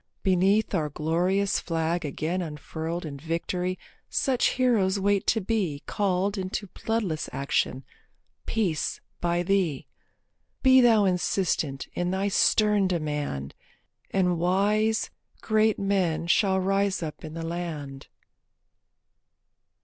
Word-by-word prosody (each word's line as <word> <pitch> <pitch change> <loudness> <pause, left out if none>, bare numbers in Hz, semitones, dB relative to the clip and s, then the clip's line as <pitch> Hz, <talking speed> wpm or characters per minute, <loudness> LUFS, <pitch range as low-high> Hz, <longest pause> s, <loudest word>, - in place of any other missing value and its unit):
Beneath 195 +4 +2
our 155 -5 0
glorious 175 +7 +1
flag 165 +1 -1
again 160 +5 -2
unfurled 160 +2 -5
In 140 -2 -6
victory 180 +3 -2 0.3
such 260 -3 +1
heroes 210 -7 +2
wait 200 0 +1
to 225 - +3
be 185 -9 -1
Called 195 0 0
into 190 +2 -3
bloodless 205 -7 -2
action, 135 -1 -1 0.6
Peace, 190 -9 -1 0.2
by 175 0 0
thee. 175 -7 0 0.8
Be 260 -1 +7
thou 225 -4 +5
insistent 180 -6 0
in 175 0 -1
thy 190 +2 0
stern 210 0 +3
demand, 150 - -3 0.6
And 180 -3 +1
wise, 210 +5 +1 0.3
great 220 0 +2
men 190 -5 0
shall 190 +2 +3
rise 195 0 +1
up 155 -2 -6
in 155 0 -7
the 165 0 -4
land. 160 -5 -5
185 Hz, 110 wpm, -26 LUFS, 160-200 Hz, 0.8 s, Be